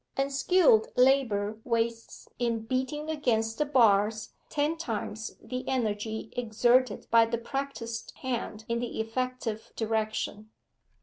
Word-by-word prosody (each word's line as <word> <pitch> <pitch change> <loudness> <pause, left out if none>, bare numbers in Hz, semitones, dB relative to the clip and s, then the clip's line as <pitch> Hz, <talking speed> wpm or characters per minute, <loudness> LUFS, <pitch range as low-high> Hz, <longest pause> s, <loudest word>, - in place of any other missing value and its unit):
Unskilled 275 -2 +4
labour 230 -5 +3
wastes 230 -1 -2
in 230 -2 -1
beating 260 +5 -2
against 225 -7 0
the 300 - +3
bars 215 -5 +3 0.2
ten 300 +2 0
times 225 -7 -4
the 255 0 -5
energy 220 -3 -2
exerted 240 0 +2
by 230 0 +7
the 230 +1 -1
practised 235 -2 -4
hand 235 -4 -3
in 235 0 0
the 240 -1 -4
effective 225 -1 -3
direction. 215 -1 -2
230 Hz, 115 wpm, -29 LUFS, 220-260 Hz, 0.2 s, by